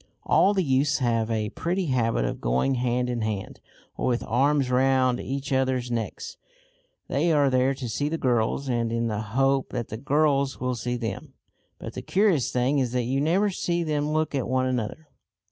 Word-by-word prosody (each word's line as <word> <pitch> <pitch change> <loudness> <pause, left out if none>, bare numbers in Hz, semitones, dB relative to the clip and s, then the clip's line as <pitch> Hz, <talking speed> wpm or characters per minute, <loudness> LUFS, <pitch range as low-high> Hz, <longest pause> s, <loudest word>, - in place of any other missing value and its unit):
All 200 +2 +3
the 190 - +2
youths 140 0 +2
have 115 -4 0
a 110 -2 -1
pretty 180 - -2
habit 115 - +1
of - - -4
going 65 - +1
hand 125 0 0
in 120 -2 -2
hand, 105 -3 -4 0.4
or - - -2
with 120 -1 0
arms 135 +2 +2
round 130 -1 +3
each 135 +1 -4
other's 130 -2 0
necks. 115 -2 -4 0.7
They 170 - +1
are 145 -3 +3
there 130 +1 +2
to 130 -2 -5
see 145 +6 -1
the 165 - -2
girls, 125 0 0
and 120 -2 0
in 115 0 0
the 105 -1 -2
hope 135 +5 +1
that 120 -3 -4
the 110 - -5
girls 140 +1 +1
will 125 0 -1
see 120 +1 -3
them. 115 -5 -5 0.4
But - - -8
the - - -5
curious 190 - +2
thing 130 +3 +1
is 125 -2 -1
that 125 -1 +1
you 130 +3 0
never 190 +7 +2
see 175 -1 -1
them 150 -1 -1
look 155 -1 0
at 135 -3 -1
one 130 +1 +1
another. 130 +4 -3
130 Hz, 195 wpm, -25 LUFS, 120-145 Hz, 0.7 s, All